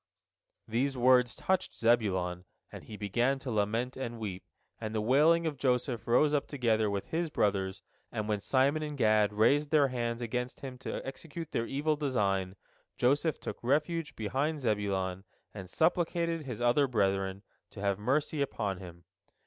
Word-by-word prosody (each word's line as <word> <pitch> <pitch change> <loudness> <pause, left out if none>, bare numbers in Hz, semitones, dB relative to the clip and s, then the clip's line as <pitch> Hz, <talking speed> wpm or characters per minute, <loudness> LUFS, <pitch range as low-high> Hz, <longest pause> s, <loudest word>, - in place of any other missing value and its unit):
These 130 +4 0
words 125 0 +4
touched 190 -1 -1
Zebulon, 95 -6 +1 0.3
and - - -10
he 105 - -9
began 120 +7 +1
to 135 -1 -6
lament 110 +4 0
and 120 -3 -5
weep, 100 -4 -5 0.4
and 110 -1 -4
the - - +1
wailing 150 +9 +4
of 155 -3 -2
Joseph 125 -2 0
rose 145 +6 +4
up 145 - +1
together 115 -6 +1
with 100 -1 -3
his 165 0 -1
brother's, 95 -7 0 0.3
and 105 -1 -3
when 105 -1 0
Simon 140 +8 +2
and 150 -1 -4
Gad 110 -3 +3
raised 140 +8 +3
their 145 -3 +4
hands 120 -2 -2
against 125 +1 -3
him 130 -2 -7
to - - -5
execute 160 +4 -7
their 115 - -1
evil 150 +3 0
design, 100 -10 0 0.4
Joseph 145 +5 +2
took - - -6
refuge 150 +5 0
behind 140 +8 -1
Zebulon, 100 -5 -1 0.3
and 95 -3 -8
supplicated 170 - +1
his 120 -3 -5
other 120 +4 +3
brethren 95 -4 0 0.3
to - - -12
have 100 -1 0
mercy 145 +6 0
upon 100 -8 -2
him. 85 -2 -11
120 Hz, 160 wpm, -31 LUFS, 105-145 Hz, 0.4 s, words